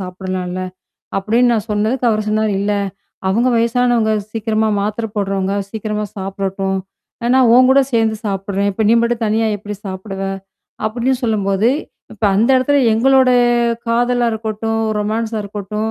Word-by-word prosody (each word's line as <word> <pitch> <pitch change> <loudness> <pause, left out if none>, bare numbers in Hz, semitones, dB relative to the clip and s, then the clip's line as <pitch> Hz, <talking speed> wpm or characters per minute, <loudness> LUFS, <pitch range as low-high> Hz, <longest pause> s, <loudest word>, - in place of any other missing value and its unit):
சாப்பிடலாம்ல. 185 0 -4 0.6
அப்டின்னு 230 +5 +2
நான் 220 0 -1
சொன்னதுக்கு, 220 +5 0
அவர் 215 -1 -1
சொன்னாரு. 215 0 +1
"இல்ல. 205 +1 0 0.6
அவங்க 235 +6 +2
வயசானவங்க. 235 -1 +2 0.2
சீக்கிரமா 220 -1 0
மாத்திரை 215 +2 -2
போடுறவங்க, 195 -1 -1 0.2
சீக்கிரமா 210 -1 -3
சாப்பிடட்டும். 195 0 -2 0.4
ஆனா 240 - 0
நான், 255 -3 +5
உன் 255 +1 +6
கூட 275 +1 +6
சேர்ந்து 225 -1 +2
சாப்புடுறேன். 195 0 -1
இப்ப 220 - -2
நீ - - +5
மட்டும் 235 0 0
தனியா 220 +1 +1
எப்படி 210 0 -7
சாப்பிடுவ?" 195 +1 -6 0.7
அப்டின்னு 245 +4 0
சொல்லும்போது, 205 -1 +1 0.5
இப்ப 215 0 -4
அந்த 225 +5 +3
இடத்துல 285 +3 +2 0.2
எங்களோட 260 +2 +4 0.6
காதலா 240 +1 +2
இருக்கட்டும், 225 0 -2 0.2
ரொமான்ஸா 220 +1 -2
இருக்கட்டும். 210 +2 -4
220 Hz, 135 wpm, -17 LUFS, 200-235 Hz, 0.7 s, உன்